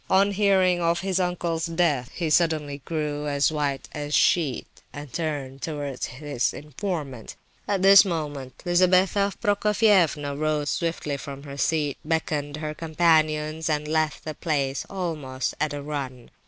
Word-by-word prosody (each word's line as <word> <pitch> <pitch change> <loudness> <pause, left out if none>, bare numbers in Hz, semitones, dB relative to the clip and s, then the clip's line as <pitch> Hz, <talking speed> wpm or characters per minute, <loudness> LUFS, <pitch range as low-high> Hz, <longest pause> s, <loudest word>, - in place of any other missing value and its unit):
On 195 +1 +4
hearing 190 -3 +3
of 170 0 +1
his 190 -1 0
uncle's 175 -2 -1
death 165 -7 +1
he 165 -3 -2
suddenly 155 -4 +1
grew 150 -2 -2
as 145 +1 +2
white 145 -3 -2
as 145 -1 -5
a - - -9
sheet, 155 -6 +2 0.3
and 145 -3 -9
turned 145 -5 -3
towards 145 -4 -4
his 140 -1 -2
informant. 150 - -5 0.3
At 195 -2 0
this 195 +1 +9
moment, 150 -8 -5
Lizabetha 185 +3 +3
Prokofievna 205 -9 +2
rose 150 0 0
swiftly 165 -4 -2
from 140 0 -8
her 140 -1 -8
seat, 145 +1 0
beckoned 150 -2 -2
her 155 0 -4
companions, 155 -1 +1
and 150 -1 0
left 155 0 0
the 155 - -4
place 140 -4 -2
almost 155 -9 -3
at 155 - +1
a 145 -1 -5
run. 135 -5 -5
155 Hz, 145 wpm, -25 LUFS, 145-175 Hz, 0.3 s, this